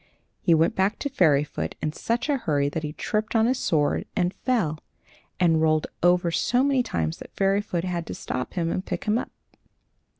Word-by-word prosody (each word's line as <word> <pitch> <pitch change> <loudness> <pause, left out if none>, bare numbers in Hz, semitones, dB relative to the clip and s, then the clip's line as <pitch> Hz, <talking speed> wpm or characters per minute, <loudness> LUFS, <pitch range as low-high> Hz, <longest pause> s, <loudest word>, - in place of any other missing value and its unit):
He 170 - +4
went 160 +1 +3
back 195 +3 +1
to 285 - -3
Fairyfoot 150 - +1
in 150 - -2
such 235 - -1
a 290 -2 +2
hurry 145 - 0
that 160 - -3
he 150 -1 -4
tripped 215 +6 -2
on 225 0 +4
his 250 +2 +1
sword 150 -3 +1
and 180 -2 +1
fell, 200 - -1 0.6
and 165 -3 +3
rolled 155 -1 +2 0.2
over 175 0 +3
so 245 +9 +2
many 275 -2 +3
times 80 - -2
that - - -12
Fairyfoot 195 -3 +1
had 175 -2 -3
to - - -5
stop 125 0 -4
him 170 -2 0
and 185 - -2
pick - - -4
him 215 +2 +1
up. - - -5
175 Hz, 195 wpm, -25 LUFS, 155-220 Hz, 0.6 s, He